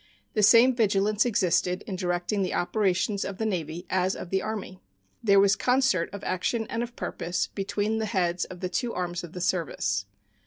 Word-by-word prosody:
The 215 - +1
same 230 +5 +7
vigilance 210 0 +2
existed 185 -3 +1
in 195 - -4
directing 180 +2 -1
the 185 - -1
operations 195 +1 0
of 195 - -5
the 220 - -2
Navy 175 -3 -3
as 185 0 +1
of 175 - -8
the 190 0 +1
Army. 210 -4 -5 0.4
There 200 -3 +5
was 200 0 +5
concert 250 -9 +2
of 200 0 -8
action 220 +5 -1
and 230 - -1
of 240 0 -5
purpose 175 +1 -2
between 205 +2 -1
the 220 - -1
heads 180 -2 0
of 180 - -11
the 185 - -2
two 235 +6 -2
arms 175 -1 -3
of 170 - -9
the 180 - -6
service. 100 - -1
195 Hz, 190 wpm, -27 LUFS, 180-215 Hz, 0.4 s, same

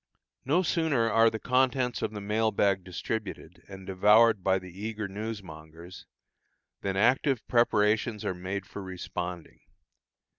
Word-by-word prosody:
No 160 +8 +2
sooner 150 -10 +1
are 115 +1 +5
the 110 - -4
contents 125 0 +1
of - - -1
the 105 - -6
mail 110 +2 +1
bag 100 -3 +1
distributed, 90 -1 -6
and 95 -1 -10
devoured 105 +2 +4
by 95 0 +3
the 90 -1 -9
eager 110 -1 -3
newsmongers, 90 -5 -8 0.7
than 95 -1 -2
active 125 +4 +2
preparations 110 -2 +2
are - - -1
made 95 +2 -5
for 100 - -8
responding. 90 -2 -6
105 Hz, 135 wpm, -28 LUFS, 95-115 Hz, 0.7 s, are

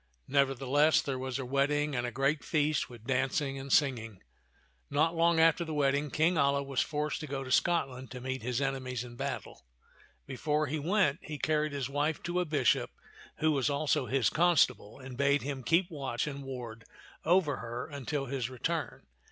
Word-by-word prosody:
Nevertheless, 140 +3 +3
there 135 -4 -3
was 130 0 -3
a 135 - -4
wedding 145 +2 +1
and 120 0 -1
a - - -4
great 135 +4 0
feast 150 -2 0
with 120 -3 -12
dancing 135 +2 0
and 135 0 -7
singing. 115 - +1 0.7
Not 160 +3 +2
long 165 0 +3
after 165 +1 +4
the 160 -2 -5
wedding 145 0 +1
King 160 +5 +2
Alia 140 -1 +2
was 135 -2 0
forced 150 0 -2
to 155 - -6
go 135 -1 -3
to 130 - -7
Scotland 135 -6 +1
to 125 - -7
meet 130 +1 -4
his 125 +3 -2
enemies 130 -3 -2
in 120 -1 -10
battle. 135 +2 -5 0.6
Before 150 +3 -1
he 150 +3 -2
went, 165 -2 +2
he 150 - -6
carried 155 +1 0
his 140 -2 -2
wife 145 +3 -1
to 175 +1 -1
a 180 - +1
bishop 145 -6 +2 0.5
who 155 0 +4
was 140 -1 +1
also 140 -2 0
his 135 -1 +2
constable, 155 -10 +2
and 130 -2 -9
bade 140 +1 +3
him 135 -1 -4
keep 170 +8 +2
watch 135 -5 -2
and 140 -2 -5
ward 120 -4 -7 0.4
over 165 -4 +3
her 120 +1 -5
until 140 -1 -4
his 130 -2 -3
return. 130 -2 -3
140 Hz, 185 wpm, -31 LUFS, 130-150 Hz, 0.7 s, after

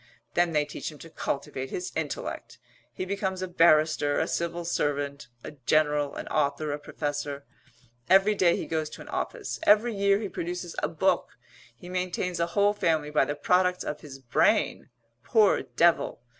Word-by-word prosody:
Then 175 -1 +2
they 150 -1 +2
teach 150 - -6
him 150 - -13
to 165 +2 -12
cultivate 135 -3 -4
his 360 +1 -4
intellect. - - -4 0.3
He 185 - -5
becomes 190 -1 -2
a - - -2
barrister, 155 -4 +3
a - - 0
civil 170 0 -2
servant, 145 -5 -2 0.2
a - - -7
general, 150 +1 +1
an - - -6
author, 145 +2 0
a 145 - -4
professor. 145 -1 -4 0.6
Every 195 +3 +6
day 180 -4 +3
he - - -4
goes 155 -1 -2
to - - -10
an - - -11
office. - - -4
Every 220 +3 +4
year 200 -1 +3
he 210 - -3
produces 175 -1 -5
a - - +1
book. - - 0 0.4
He 150 - -13
maintains 180 -1 -2
a 170 - +1
whole 205 +1 +4
family 160 -6 0
by 150 - +3
the 145 - -3
products 180 +4 +2
of 150 - -5
his 140 -3 -10
brain 130 -3 +1 0.3
poor 215 -4 +4
devil! 135 +1 +1
165 Hz, 170 wpm, -27 LUFS, 145-185 Hz, 0.6 s, Every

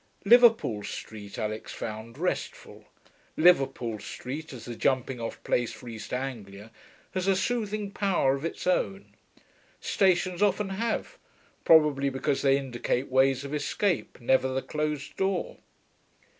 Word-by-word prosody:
Liverpool 225 - +5
Street 105 0 -8
Alix 110 0 -4
found 110 +3 -7
restful. 180 +3 -4 0.5
Liverpool 135 -9 +3
Street, 145 +9 -7
as 125 -4 -9
the 120 - -6
jumping 130 0 0
off 115 - -4
place 120 -1 0
for 110 +3 -12
East 115 -2 -8
Anglia, 110 -5 -5 0.4
has 185 0 -2
a 195 - +4
soothing 210 -1 -2
power 190 -10 +2
of 140 +1 -4
its 165 - -4
own. 195 +2 -1 0.7
Stations 185 -1 +1
often 205 0 +2
have, 230 - -3 0.5
probably 150 -4 +5
because 135 +1 -1
they 135 -1 +4
indicate 130 -1 -2
ways 130 0 +3
of 140 - -6
escape, 170 +5 -1
never 130 +2 +2
the 130 0 -2
closed 150 -2 -3
door. 190 -1 -1
140 Hz, 130 wpm, -28 LUFS, 125-185 Hz, 0.7 s, Liverpool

